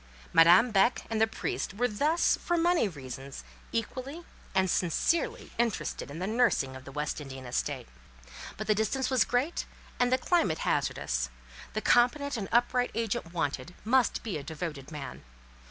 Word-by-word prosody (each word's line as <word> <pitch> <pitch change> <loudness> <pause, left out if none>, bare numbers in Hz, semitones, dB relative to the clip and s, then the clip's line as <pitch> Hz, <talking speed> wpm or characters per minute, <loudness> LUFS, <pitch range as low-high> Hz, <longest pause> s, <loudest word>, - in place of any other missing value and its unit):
Madame 175 +9 +7
Beck 200 +4 +3
and 220 -1 0
the 220 - +5
priest 210 -2 -3
were 245 +4 +2
thus, 295 +10 +2
for 345 - -1
money 340 -7 +3
reasons, 135 -4 -8 0.3
equally 255 +8 -4 0.3
and 190 0 +3
sincerely 340 - 0
interested 215 -14 -1
in 145 - -7
the 180 - -2
nursing 215 - +2
of 130 0 -10
the 135 - -9
West 150 +2 -3
Indian 135 -2 -8
estate. 120 - -2 0.7
But - - -4
the 215 - +3
distance 235 +6 0
was 255 -3 +5
great, 250 +9 -1 0.3
and 245 0 +3
the 255 - +5
climate 260 - +1
hazardous. 60 0 0 0.4
The 215 - -1
competent 285 +5 +3
and 200 -5 -4
upright 245 +1 +3
agent 220 -7 -2
wanted, 160 -1 -3
must 255 +2 +2
be 200 -9 -3
a - - -8
devoted 150 -2 -6
man. 150 -3 -7
215 Hz, 160 wpm, -29 LUFS, 155-250 Hz, 0.7 s, Madame